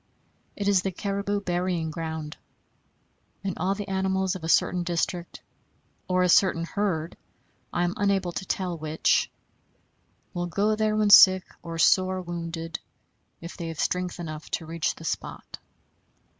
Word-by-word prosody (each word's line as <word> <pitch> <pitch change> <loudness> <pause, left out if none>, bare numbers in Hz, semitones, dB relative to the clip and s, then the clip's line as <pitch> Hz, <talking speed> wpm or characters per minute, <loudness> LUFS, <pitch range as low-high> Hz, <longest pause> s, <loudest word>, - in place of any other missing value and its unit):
It 200 - -3
is 200 -3 +4
the 195 - -2
caribou 200 +2 -2
burying 175 -3 -1
ground; 160 -1 -5 1.1
and 195 -2 -2
all 190 +2 +1
the 205 0 -6
animals 190 -1 0
of 185 - -8
a 160 - -3
certain 180 +1 +3
district, 175 0 -3 0.6
or 185 0 +2
a - - +3
certain 175 -1 +4
herd 175 -4 -2 0.6
(I 175 - 0
am 175 0 0
unable 195 -3 +1
to 170 +3 -5
tell 180 -2 -2
which), 155 0 +1 1.0
will 175 -1 -2
go 205 +5 +1
there 215 0 +1
when 210 -1 +3
sick 185 -2 +9 0.2
or 165 -1 -6
sore 185 +3 +3
wounded, 165 -2 -5 0.6
if 170 +1 -8
they 170 -2 -5
have 165 -2 -6
strength 180 -1 -1
enough 155 -2 -7
to 165 - -3
reach 165 0 -2
the 165 - -11
spot. - - -5
180 Hz, 150 wpm, -26 LUFS, 165-190 Hz, 1.1 s, sick